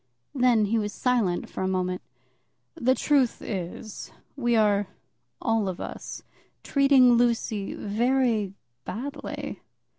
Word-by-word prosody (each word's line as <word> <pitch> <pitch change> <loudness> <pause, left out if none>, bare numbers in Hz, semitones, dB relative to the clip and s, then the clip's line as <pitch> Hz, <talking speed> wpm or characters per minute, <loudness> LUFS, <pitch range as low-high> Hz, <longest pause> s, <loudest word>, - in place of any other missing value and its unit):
Then 245 -5 +4
he 225 +3 +1
was 205 -1 -3
silent 230 -9 +1
for - - -6
a 190 - 0
moment. 185 -1 -1 0.7
"The 260 -5 +2
truth 275 -5 +2
is, 190 +2 -6 0.2
we 240 -4 +1
are, 205 -2 +3 0.5
all 225 -3 +1
of 180 - -5
us, - - -7 0.4
treating 275 -3 +5
Lucy 230 -4 0
very 225 -2 +1 0.3
badly." 265 - -6
225 Hz, 115 wpm, -26 LUFS, 200-250 Hz, 0.7 s, treating